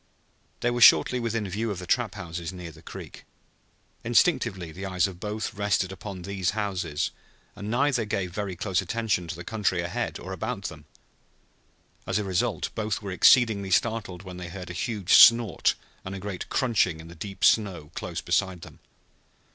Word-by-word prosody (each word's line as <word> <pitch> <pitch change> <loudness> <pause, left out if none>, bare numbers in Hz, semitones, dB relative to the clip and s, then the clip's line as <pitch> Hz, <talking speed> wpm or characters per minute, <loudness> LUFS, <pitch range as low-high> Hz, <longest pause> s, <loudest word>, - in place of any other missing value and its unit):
They 120 - +2
were 120 0 -2
shortly 125 +2 +7
within 115 -3 -2
view 110 +5 -2
of 100 - -3
the 90 - -7
trap 115 +1 0
houses 85 -3 -5
near 90 -3 -8
the - - -16
creek. - - -10 0.8
Instinctively 120 - +2
the 90 +5 -8
eyes 90 -3 +1
of 90 -3 -9
both 105 +2 -4
rested 100 -2 0
upon 95 -1 -7
these 95 -1 -1
houses 90 - -2 0.4
and 100 - -6
neither 125 0 +2
gave 95 -4 -2
very 100 -2 -3
close 95 +1 0
attention 100 -2 -1
to 80 - -5
the 85 - -8
country 100 -3 -1
ahead 85 0 -3
or - - -7
about - - -4
them. - - -7 1.2
As - - 0
a 105 - 0
result 95 -3 -1
both 110 -1 -2
were 100 - -4
exceedingly 100 0 +5
startled 95 -3 0
when 90 -2 -9
they 90 -1 -7
heard 90 0 -7
a - - -6
huge 100 0 -1
snort 115 -5 +7 0.3
and 95 +1 -6
a - - -5
great 100 -2 -6
crunching 105 -10 +1
in 80 - -10
the 85 - -11
deep 100 +4 -8
snow 95 -9 +2
close - - -5
beside 95 -4 0
them. - - -12
95 Hz, 180 wpm, -26 LUFS, 90-110 Hz, 1.2 s, shortly